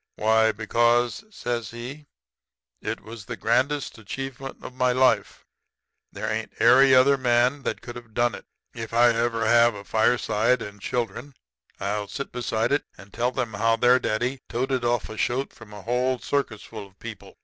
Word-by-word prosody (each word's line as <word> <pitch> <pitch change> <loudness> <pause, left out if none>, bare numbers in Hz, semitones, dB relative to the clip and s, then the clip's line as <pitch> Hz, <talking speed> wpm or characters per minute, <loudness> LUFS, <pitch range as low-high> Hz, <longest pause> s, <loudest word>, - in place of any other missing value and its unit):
"'Why, 110 +1 +3
because,' 120 - +1
says 120 - -3
he, 130 +6 -8 0.7
'it - - -4
was 110 -1 -10
the - - -6
grandest 130 +3 0
achievement 135 +4 -6
of - - -8
my 125 0 +2
life. 130 +1 +2 0.7
There - - -5
ain't - - -3
airy 130 +3 +7
other 135 +2 +5
man 125 +2 +2
that - - -4
could 120 0 -8
have 120 -3 -12
done 120 0 +2
it. - - -9 0.3
If 115 0 -6
I 120 +1 +6
ever 115 0 0
have 120 0 +5
a 100 - -8
fireside 115 +2 +2
and 105 0 -10
children, 125 +4 -3 0.4
I'll 105 +1 -2
sit 140 +7 -6
beside 115 -1 -1
it 145 - +2
and 100 0 -15
tell 125 +2 -1
'em 115 -3 -2
how 115 +3 +2
their 125 +2 +4
daddy 125 +3 -1
toted 130 +1 -1
off 120 0 0
a 110 - -9
shoat 130 +3 -1
from 110 -2 -14
a 105 -2 -10
whole 125 +2 0
circus 125 -5 -2
full 105 -3 -9
of 100 0 -27
people. 115 -3 -10
120 Hz, 175 wpm, -25 LUFS, 110-130 Hz, 0.7 s, airy